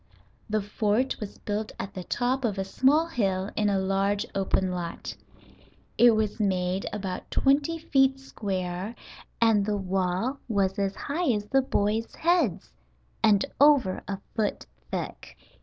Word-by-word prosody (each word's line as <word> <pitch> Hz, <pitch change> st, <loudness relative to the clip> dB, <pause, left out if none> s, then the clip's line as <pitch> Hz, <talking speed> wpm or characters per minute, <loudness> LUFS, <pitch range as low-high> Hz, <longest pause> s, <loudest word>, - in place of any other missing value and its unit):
The 215 Hz, -1 st, 0 dB
fort 210 Hz, +5 st, 0 dB
was 210 Hz, -2 st, -7 dB
built 210 Hz, +1 st, -3 dB
at 195 Hz, -, -5 dB
the 185 Hz, -2 st, -6 dB
top 250 Hz, +7 st, -1 dB
of 210 Hz, -4 st, 0 dB
a 195 Hz, -, 0 dB
small 270 Hz, +11 st, +3 dB
hill 195 Hz, -, -1 dB
in 210 Hz, -1 st, +2 dB
a 200 Hz, -, +2 dB
large 195 Hz, +1 st, +1 dB
open 190 Hz, -1 st, 0 dB
lot. 175 Hz, -2 st, -5 dB, 0.8 s
It 240 Hz, -2 st, +6 dB
was 215 Hz, -1 st, -1 dB
made 185 Hz, -2 st, 0 dB
about 195 Hz, -3 st, -5 dB
twenty 285 Hz, +4 st, +2 dB
feet 270 Hz, -4 st, +2 dB
square 190 Hz, -4 st, -4 dB, 0.4 s
and 225 Hz, -3 st, +4 dB
the 205 Hz, 0 st, 0 dB
wall 190 Hz, +7 st, -1 dB
was 200 Hz, -3 st, 0 dB
as 195 Hz, -1 st, 0 dB
high 320 Hz, +3 st, -2 dB
as 205 Hz, -1 st, -2 dB
the 270 Hz, +6 st, +3 dB
boys' 220 Hz, -2 st, -1 dB
heads 335 Hz, -, +1 dB, 0.5 s
and 205 Hz, -2 st, +5 dB, 0.2 s
over 280 Hz, -10 st, +5 dB
a 195 Hz, -, -3 dB, 0.2 s
foot 215 Hz, -3 st, -1 dB, 0.2 s
thick. -, -, -5 dB
210 Hz, 145 wpm, -27 LUFS, 195-255 Hz, 0.8 s, It